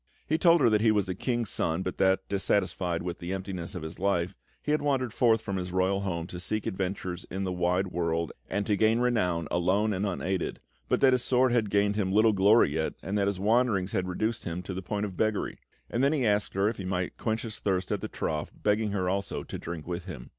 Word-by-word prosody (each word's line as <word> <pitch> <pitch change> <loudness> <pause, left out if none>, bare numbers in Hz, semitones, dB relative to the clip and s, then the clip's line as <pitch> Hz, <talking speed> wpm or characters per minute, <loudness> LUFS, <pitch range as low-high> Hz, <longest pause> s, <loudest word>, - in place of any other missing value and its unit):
He 155 +2 0
told 170 -1 +5
her 120 - +6
that 105 -1 +3
he 110 - +4
was 105 -3 +1
a 90 - -1
king's 120 +2 -1
son, 80 +3 0
but 95 - -4
that, 95 0 +3
dissatisfied 95 -3 0
with 90 0 -4
the 85 +1 -5
emptiness 95 -1 -4
of 90 - -5
his 80 +2 -7
life, 90 -2 +1 0.3
he 150 - -1
had 150 - +2
wandered 135 -5 0
forth 115 -3 +3
from 100 -1 -2
his 90 -1 -4
royal 95 +2 +1
home 85 -4 -2
to 90 0 -7
seek 110 +4 -2
adventures 95 -2 -3
in 95 +1 -3
the 95 - -1
wide 90 +2 +1
world 85 -2 -1 0.2
and 100 0 -1
to 105 - +2
gain 110 +2 +3
renown 90 -10 +1
alone 95 +5 +2
and 100 +2 -1
unaided, 95 -1 -2 0.3
but - - +2
that 135 -2 +6
his 125 -1 +1
sword 130 0 +3
had 115 -4 +2
gained 100 +1 +2
him 95 -3 0
little 110 +2 +5
glory 100 -2 +5
yet, 80 0 -1
and 100 - -3
that 100 -1 +2
his 100 -2 -1
wanderings 105 -3 +2
had 90 - -1
reduced 110 +5 -2
him 85 +1 -4
to 95 - -5
the 95 - -4
point 105 +2 -2
of 95 -3 -6
beggary; 110 0 -1 0.3
and 120 - -1
then 140 +2 +4
he 135 -5 +1
asked 105 -2 +1
her 95 +1 +2
if 110 - -1
he 95 - -5
might 90 -1 -2
quench 110 -1 -1
his 110 -2 -5
thirst 95 -2 -1
at - - -1
the - - -3
trough, 75 -1 -3
begging 105 +1 +2
her 95 -3 0
also 100 +2 -2
to - - -7
drink 85 -2 -6
with 85 0 -4
him. 75 -11 -8
95 Hz, 245 wpm, -28 LUFS, 90-110 Hz, 0.3 s, her